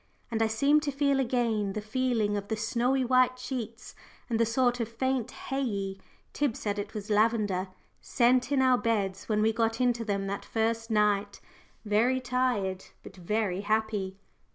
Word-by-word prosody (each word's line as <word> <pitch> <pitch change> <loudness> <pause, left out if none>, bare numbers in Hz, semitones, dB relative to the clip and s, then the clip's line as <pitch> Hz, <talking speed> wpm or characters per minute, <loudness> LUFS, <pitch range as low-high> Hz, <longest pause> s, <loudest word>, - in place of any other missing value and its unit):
and 225 -1 -1
I 225 - +4
seem 280 +7 +3
to 295 -1 -2
feel 280 0 +1
again 230 -6 0
the 215 - -3
feeling 220 -1 0
of 200 -1 -4
the 220 - -2
snowy 245 +4 +1
white 255 0 +3
sheets 245 -3 -6 0.4
and 225 - +1
the 230 - +3
sort 245 +1 +1
of 230 -2 -2
faint 260 0 -1
hay 270 +1 -4
ey 200 -6 -2 0.4
Tib 285 -6 0
said 205 -1 -3
it 210 +2 -6
was 210 0 -5
lavender 210 -3 +2 0.3
scent 250 +2 +2
in 270 -2 +3
our 255 -1 +4
beds 205 -5 -1
when 210 -1 +2
we 220 0 +3
got 225 0 0
into 245 -2 +1
them 200 -2 -2
that 200 +1 -4
first 225 0 -1
night 210 -2 +1 0.5
very 230 +5 +2
tired, 245 -7 -1 0.2
but - - -11
very 195 +1 -1
happy. 210 -2 -1
225 Hz, 175 wpm, -29 LUFS, 205-250 Hz, 0.5 s, I